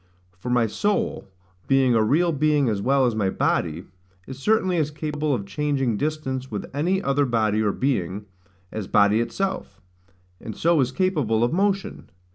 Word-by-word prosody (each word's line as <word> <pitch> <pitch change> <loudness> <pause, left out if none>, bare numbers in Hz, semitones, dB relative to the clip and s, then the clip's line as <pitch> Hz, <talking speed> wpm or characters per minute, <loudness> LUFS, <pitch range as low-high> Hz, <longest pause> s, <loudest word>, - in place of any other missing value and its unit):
For 95 +7 -7
my 120 -1 +3
soul, 205 - -1 0.4
being 135 -2 +3
a 115 - +3
real 165 +10 +2
being 150 -2 +2
as 105 -2 -1
well 135 +3 +3
as 120 - +1
my 105 -3 0
body, 85 -2 -1 0.4
is 130 0 -9
certainly 190 0 +1
as 155 -2 +1
capable 150 0 -3
of 120 -7 -1
changing 135 +1 -1
distance 135 -2 -3
with 105 - -4
any 180 +7 0
other 140 +1 +2
body, 110 -3 +1
or 105 -2 +2
being, 105 -6 -2 0.5
as 110 -3 -5
body 105 +2 +4
itself; 190 - -3 0.6
and 110 - -8
so 165 -2 +3
is 125 -1 0
capable 140 - +1
of 120 - +1
motion. 195 +1 -1
135 Hz, 165 wpm, -23 LUFS, 110-155 Hz, 0.6 s, body